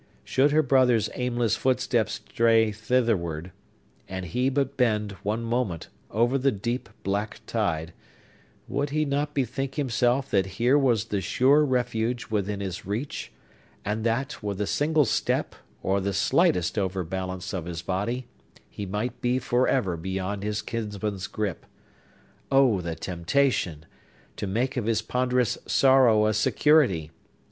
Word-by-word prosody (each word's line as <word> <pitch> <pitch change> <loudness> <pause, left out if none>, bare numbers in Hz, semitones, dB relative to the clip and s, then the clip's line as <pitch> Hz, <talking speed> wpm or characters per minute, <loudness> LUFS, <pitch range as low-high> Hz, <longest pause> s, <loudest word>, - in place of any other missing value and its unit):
Should 135 +2 +3
her 155 +2 +3
brother's 125 -5 +3
aimless 120 -3 0
footsteps 125 -3 +1
stray 115 -1 +3
thitherward, 100 -7 0 0.6
and 95 -1 -4
he 125 +9 0
but 140 0 -1
bend, 105 -5 +1
one 110 +3 -2
moment, 115 -8 -2 0.2
over 120 +5 +2
the 135 +1 +3
deep, 120 +5 -3
black 100 +3 -2
tide, 85 -7 -1 0.7
would 140 +1 -1
he 155 +2 0
not 145 +1 -1
bethink 135 0 -2
himself 125 -1 +1
that 95 -2 +2
here 125 +4 +4
was 125 -7 +3
the 105 -3 -2
sure 135 - +4
refuge 125 -3 -1
within 100 -1 -1
his 95 -3 -4
reach, 110 +9 -4 0.5
and 105 +2 -2
that, 120 +5 -1
with 100 -2 -4
a 105 - 0
single 150 +5 +2
step, - - 0 0.3
or 95 +1 +1
the 100 +1 -1
slightest 90 -1 +2
overbalance 95 -1 -3
of 90 -4 -3
his 85 -1 -5
body, 105 +8 -2 0.5
he 100 - -6
might 105 +6 -3
be 125 +1 +1
forever 120 -7 +1
beyond 95 +3 -3
his 105 0 -2
kinsman's 105 -3 -4
gripe? 105 -5 -3 0.9
Oh, 130 -8 +4
the 85 -1 -4
temptation! 90 - 0 0.5
To 105 - -3
make 120 +7 -1
of 115 -3 -1
his 115 -1 +1
ponderous 125 -1 0
sorrow 130 -5 +5
a 110 - +2
security! 110 - +3
115 Hz, 140 wpm, -26 LUFS, 95-130 Hz, 0.9 s, sorrow